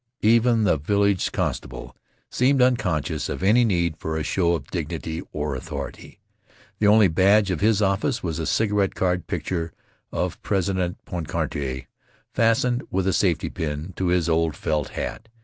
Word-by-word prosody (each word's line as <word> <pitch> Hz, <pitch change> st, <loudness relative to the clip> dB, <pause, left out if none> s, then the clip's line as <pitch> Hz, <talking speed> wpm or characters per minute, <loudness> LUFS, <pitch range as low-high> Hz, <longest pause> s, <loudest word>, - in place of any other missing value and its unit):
Even 115 Hz, +1 st, +4 dB
the 90 Hz, -6 st, +3 dB
village 100 Hz, +4 st, +1 dB
constable -, -, -4 dB, 0.4 s
seemed 135 Hz, +2 st, +2 dB
unconscious 105 Hz, -, +1 dB
of -, -, -4 dB
any 110 Hz, +5 st, +5 dB
need 85 Hz, -7 st, +1 dB
for 80 Hz, 0 st, -3 dB
a 80 Hz, -, -2 dB
show 85 Hz, -1 st, +1 dB
of -, -, -6 dB
dignity 80 Hz, -1 st, -4 dB
or 75 Hz, -2 st, -3 dB
authority. 65 Hz, -, -7 dB, 0.6 s
The 105 Hz, -, +3 dB
only 105 Hz, -1 st, +6 dB
badge 95 Hz, +4 st, +3 dB
of 90 Hz, -, -2 dB
his 105 Hz, 0 st, +3 dB
office 100 Hz, +7 st, 0 dB
was 85 Hz, -3 st, -2 dB
a 80 Hz, -, -2 dB
cigarette 105 Hz, +1 st, +1 dB
card 90 Hz, -2 st, 0 dB
picture 85 Hz, -2 st, -3 dB, 0.4 s
of -, -, -3 dB
President 95 Hz, -2 st, -1 dB
Poincare, 70 Hz, -6 st, -3 dB, 0.5 s
fastened 120 Hz, +2 st, +2 dB
with 95 Hz, 0 st, -1 dB
a 95 Hz, -, +2 dB
safety 90 Hz, -3 st, +1 dB
pin 75 Hz, +3 st, -4 dB
to 95 Hz, -, -1 dB
his 90 Hz, -2 st, +2 dB
old 80 Hz, -1 st, +1 dB
felt 75 Hz, -2 st, -1 dB
hat. 110 Hz, -, -5 dB
90 Hz, 155 wpm, -24 LUFS, 80-105 Hz, 0.6 s, only